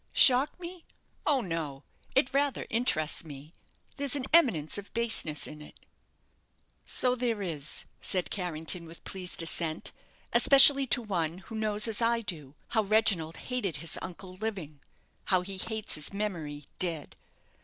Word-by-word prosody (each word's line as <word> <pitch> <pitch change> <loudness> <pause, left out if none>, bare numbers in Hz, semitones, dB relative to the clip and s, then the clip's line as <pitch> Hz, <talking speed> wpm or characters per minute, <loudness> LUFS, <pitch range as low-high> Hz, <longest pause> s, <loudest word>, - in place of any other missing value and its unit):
"Shock 265 +6 +6
me? 350 -1 -8 0.4
Oh 280 -3 +3
no! 160 -8 -5 0.3
It 265 0 +2
rather 280 -1 +1
interests 195 -11 0
me; 150 0 -11 0.4
there's 280 -1 +1
an 270 -3 -2
eminence 205 - +4
of 200 - -12
baseness 225 -10 0
in 150 0 -7
it." 150 - -14 1.1
"So 250 -1 +3
there 235 -4 -1
is," 155 -5 -2 0.2
said 185 -2 0
Carrington, 170 -2 0
with 165 +1 -13
pleased 180 -3 -1
assent, 165 -1 -1 0.4
"especially 275 0 +8
to 245 - +3
one 170 -5 -2
who 195 +4 -13
knows, 215 0 +1
as 225 0 -1
I 230 0 +2
do, 155 -9 -6
how 220 - +2
Reginald 200 -6 +1
hated 245 - -3
his 155 +2 -4
uncle, 185 0 -8
living 185 -9 -5 0.5
how 185 -1 +3
he 190 +1 -6
hates 220 +2 -3
his 150 -2 -2
memory, 165 -8 -4
dead. 165 -5 -1
190 Hz, 145 wpm, -29 LUFS, 160-235 Hz, 1.1 s, especially